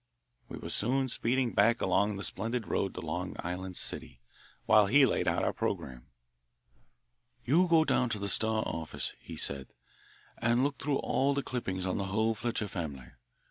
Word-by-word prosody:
We - - -7
were - - -6
soon 130 +4 +1
speeding 120 +1 0
back 115 +4 +4
along 100 +1 +1
the 100 - -5
splendid 115 +5 -2
road 95 - -1
to - - -5
Long 90 +3 -4
Island 90 +1 -4
City, - - -4 0.5
while 105 0 +6
he 140 +6 +6
laid 125 - 0
out - - +1
our - - +1
programme. 60 0 -4 1.4
"You 170 +8 +4
go 165 -2 +5
down 125 -5 +2
to 110 - -1
the 100 0 -3
Star 110 +2 +2
office," 80 -1 -3
he - - -9
said, 70 -1 0 0.7
"and 120 +2 +2
look 140 -2 -1
through 140 -1 0
all 140 +1 +1
the 140 - -1
clippings 95 -7 -3
on 95 +2 -1
the 100 - -1
whole 110 +3 +1
Fletcher 110 -1 -2
family. 75 -10 -6
110 Hz, 175 wpm, -31 LUFS, 95-125 Hz, 1.4 s, while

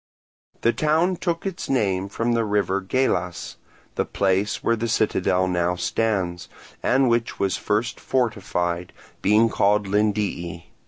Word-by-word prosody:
The 115 - +3
town 160 +4 +2
took 170 -1 -2
its 190 -3 -4
name 100 -7 0
from 115 +3 -1
the 115 -1 +2
river 100 -2 0
Gelas, 95 -4 -1 0.4
the - - 0
place 100 +1 0
where 115 - +2
the 115 +1 -2
citadel 95 -4 +1
now 90 0 0
stands, 90 -3 -1 0.3
and 130 +1 +3
which 115 -1 0
was 95 -1 0
first 110 +4 -1
fortified, 90 -8 -1 0.3
being 105 +3 +4
called 105 -1 +2
Lindii. 100 -5 -1
105 Hz, 130 wpm, -23 LUFS, 95-115 Hz, 0.4 s, being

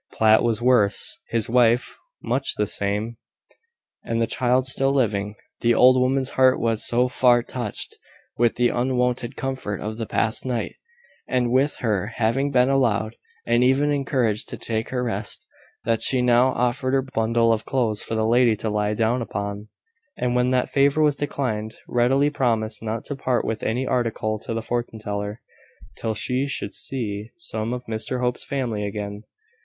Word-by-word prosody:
Platt 110 0 +4
was 115 -1 0
worse, 115 -6 +4
his 115 -2 0
wife 120 0 +2 0.2
much 135 +2 +1
the 105 - 0
same, 105 +3 -2 0.9
and 115 0 -2
the 115 - +2
child 125 +2 +1
still 135 +1 +2
living. 105 -6 0 0.2
The 120 0 +2
old 130 +2 +6
woman's 130 +1 +1
heart 130 0 +4
was 115 -2 0
so 125 +1 +3
far 125 -1 +3
touched 120 -5 -4 0.4
with 120 0 +2
the 120 0 +2
unwonted 125 0 -1
comfort 130 -7 -4
of 110 +1 -5
the 115 -2 -4
past 110 0 0
night, 125 -3 -2 0.5
and 125 -2 0
with 135 +3 +2
her 105 0 -1
having 120 +5 +1
been 125 -2 +3
allowed, 115 -5 +1 0.3
and 120 +1 +3
even 135 +3 +3
encouraged, 130 -6 0
to - - -5
take 110 0 -3
her 125 -1 -2
rest, 110 -3 -3 0.4
that 115 -1 +1
she 130 -2 +2
now 125 +1 +4
offered 130 +1 0
her 135 - +2
bundle 115 -2 +1
of 110 0 -2
clothes 115 -6 0
for 115 - -4
the 110 0 +1
lady 120 0 +4
to 110 +1 -3
lie 105 0 0
down 115 +3 +1
upon; 100 -1 -5 0.5
and 125 0 -1
when 125 0 +2
that 125 -1 0
favour 140 +2 +3
was 150 -2 +3
declined, 115 -7 -3
readily 135 +4 +2
promised 110 -6 -1
not 110 0 -4
to 145 - -4
part 130 -2 -1
with 110 - -3
any 125 +4 -1
article 115 -3 -1
to 115 - -5
the 115 - -3
fortune 120 -1 -3
teller, 105 0 -5 0.6
till 110 -1 -2
she 130 +5 -1
should 100 -7 -4
see 110 -5 -3
some 115 -10 -3
of 125 0 -5
Mr 110 +3 -3
Hope's 125 -1 -1
family 120 -7 -3
again. 105 +1 -5
120 Hz, 170 wpm, -23 LUFS, 110-130 Hz, 0.9 s, old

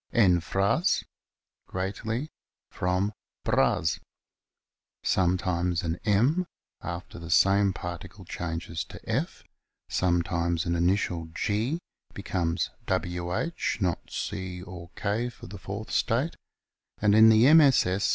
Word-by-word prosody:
en 95 -7 +5
fras, 100 - +1 0.6
greatly, 110 +9 -3 0.4
from 90 +3 0 0.3
bras, 85 -2 +2 1.0
sometimes 90 -1 +1
an 85 +1 -2
M 125 - +2 0.3
after 85 0 -6
the 85 -1 -8
same 100 +3 +4
particle 85 -2 -7
changes 80 -1 -4
to - - -11
F - - -2
t - - -33 0.4
sometimes 85 -1 +1
an 85 0 0
initial 85 -1 +1
G 110 +9 0 0.4
becomes 90 -3 -1 0.2
Wh, 90 - -1 0.3
not 90 -5 -1
C 95 -3 -4
or 90 -3 -9
K, 110 +4 -1
for 120 - -13
the 100 +2 -9
fourth 100 +4 -6
state, 125 +8 +1 0.6
and 105 -1 +3
in 110 +1 +8
the 115 +7 +6
MSS. 100 - +5
95 Hz, 110 wpm, -27 LUFS, 85-110 Hz, 1.0 s, in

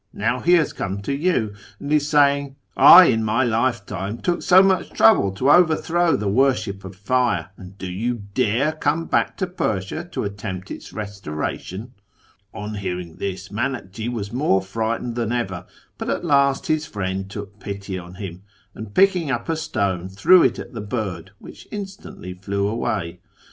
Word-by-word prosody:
Now 115 +4 -1
he 175 +7 +3
has 165 -4 +3
come 100 0 -4
to 140 - -2
you, 140 - 0 0.3
and 145 +1 -3
is 150 -1 +2
saying, 140 -2 +3 0.2
" - - -41
I, - - +10
in 110 0 +2
my 110 +4 +1
lifetime, 110 -4 -1
took 175 +6 -1
so 185 +1 +6
much 190 -2 +2
trouble 110 -3 +4
to 130 +9 +2
overthrow 175 0 +3
the 105 - -2
worship 110 -3 +1
of 95 0 -9
Fire, 100 -4 0
and 95 0 -13
do 95 - -7
you 110 +5 -3
dare 125 +5 +1
come 155 +1 -1
back - - 0
to 190 - 0
Persia 110 - -3
to - - -3
attempt 100 -2 -6
its - - -8
restoration? 100 +2 -5 0.2
" - - -35
' - - -33
" 100 - -45
On 105 +1 -6
hearing 90 -4 -5
this 95 -1 -5
Miinakji 110 -1 -3
was 105 -3 -5
more 125 -7 +2
frightened 115 +4 -2
than 115 -1 -2
ever; 95 -8 -3 0.3
but - - -4
at - - -2
last 140 -3 +3
his 155 0 0
friend 95 -3 -4
took 100 0 -8
pity 100 -1 -6
on 90 0 -11
him, 95 -2 -7 0.3
and 110 -2 -9
picking 185 -5 +3
up 120 -3 -2
a 165 - +1
stone 100 - -2
threw 100 - +5
it - - +2
at - - -8
the 115 - -5
bird, 105 -3 -4
which - - -13
instantly 195 - -8
flew 100 +2 -2
away. 100 -5 -2
110 Hz, 180 wpm, -22 LUFS, 100-140 Hz, 0.3 s, I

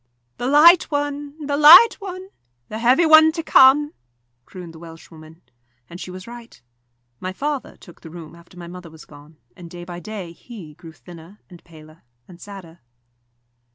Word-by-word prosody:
"The 245 - -5
light 320 +5 +4
one, 290 0 -5
the 285 0 -3
light 345 +10 +7
one 375 -2 -10 0.4
the 215 - -7
heavy 255 +8 +2
one 315 0 +5
to 330 -1 -6
come," 290 +1 +3 0.5
crooned 175 -3 -12
the 160 - -15
Welshwoman. 165 0 -16 0.4
And 175 - -13
she - - -9
was 185 +1 -11
right. 235 - -14 0.6
My 185 - -6
father 285 +7 -6
took 175 - -19
the 165 - -13
room 165 -1 -13
after 170 +1 -20
my 175 - -11
mother 180 -1 -12
was 160 -1 -17
gone, 150 +1 -19 0.2
and 175 -2 -14
day 175 0 -11
by 175 0 -10
day 190 -2 -9
he 170 -3 -14
grew 165 +2 -15
thinner 175 +4 -17
and 175 - -16
paler 155 -1 -19 0.3
and 175 -1 -17
sadder. 185 -5 -13
185 Hz, 170 wpm, -19 LUFS, -, 0.6 s, light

